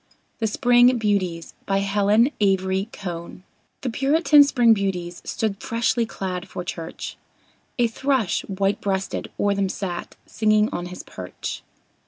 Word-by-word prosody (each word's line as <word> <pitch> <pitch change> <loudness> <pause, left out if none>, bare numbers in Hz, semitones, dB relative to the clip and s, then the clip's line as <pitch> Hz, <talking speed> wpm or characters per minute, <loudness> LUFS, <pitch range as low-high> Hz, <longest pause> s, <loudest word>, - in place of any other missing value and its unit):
THE 225 - +1
SPRING 245 +2 +4
BEAUTIES 190 -6 -1
BY 195 - +2
HELEN 205 +5 +3
AVERY 190 +1 +1
CONE 175 -1 -7 0.4
The 250 - -2
Puritan 290 +4 +5
Spring 245 -5 +4
Beauties 180 -4 -3
stood 210 -3 -2
freshly 230 0 0
clad 185 -3 -4
for 180 - -5
church; 165 -2 -6 0.6
A 240 - +3
thrush, 250 -2 0
white 195 0 0
breasted, 195 -1 -2
o'er 205 0 +2
them 195 -1 0
sat 185 -2 -5
singing 215 0 +2
on 175 0 -4
his 180 0 -8
perch. 90 -1 -7
200 Hz, 135 wpm, -23 LUFS, 190-230 Hz, 0.6 s, Puritan